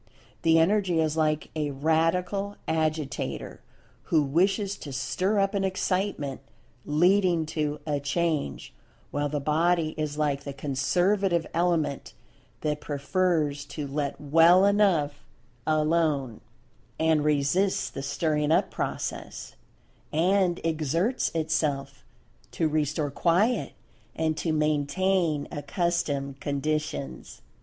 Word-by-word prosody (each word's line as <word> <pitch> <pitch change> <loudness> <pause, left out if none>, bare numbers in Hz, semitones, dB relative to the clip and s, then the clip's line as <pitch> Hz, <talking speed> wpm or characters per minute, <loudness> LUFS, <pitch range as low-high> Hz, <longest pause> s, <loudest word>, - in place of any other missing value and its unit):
The 165 -1 +4
Energy 180 0 +3
is 155 -1 +1
like 155 -1 0
a 150 -2 -1
Radical 165 +7 0
Agitator 155 -3 -2 0.4
who 155 -2 +3
wishes 195 +7 +1
to 145 - -8
stir 185 +10 -1
up 195 +1 +1
an 200 -1 0
Excitement, 185 -7 -1 0.5
leading 175 +2 +3
to 150 -1 -2
"a 145 -2 -1
change," 150 - -2 0.4
while 145 0 -1
the 145 0 -2
Body 160 +2 +1
is 150 -1 -2
like 145 -2 0
the 140 - -6
Conservative 175 +6 +1
element 165 -4 0 0.5
that 150 -1 -1
prefers 150 0 0
to 150 - -6
"let 140 0 -3
well 165 +6 +5
enough 175 -8 +2 0.4
alone," 155 -6 +1 0.6
and 160 -2 +3
resists 150 +6 +1
the - - -6
stirring 150 +2 0
up - - +2
process, - - -5 0.6
and 180 +2 +2
exerts 165 - 0
itself 145 -4 -1 0.5
to 160 - +1
restore 150 -1 -1
quiet, 180 - +1 0.4
and 160 -1 0
to 165 - -1
maintain 155 +2 +1
accustomed 145 -3 -2
conditions. 140 - -3
155 Hz, 110 wpm, -27 LUFS, 145-175 Hz, 0.6 s, well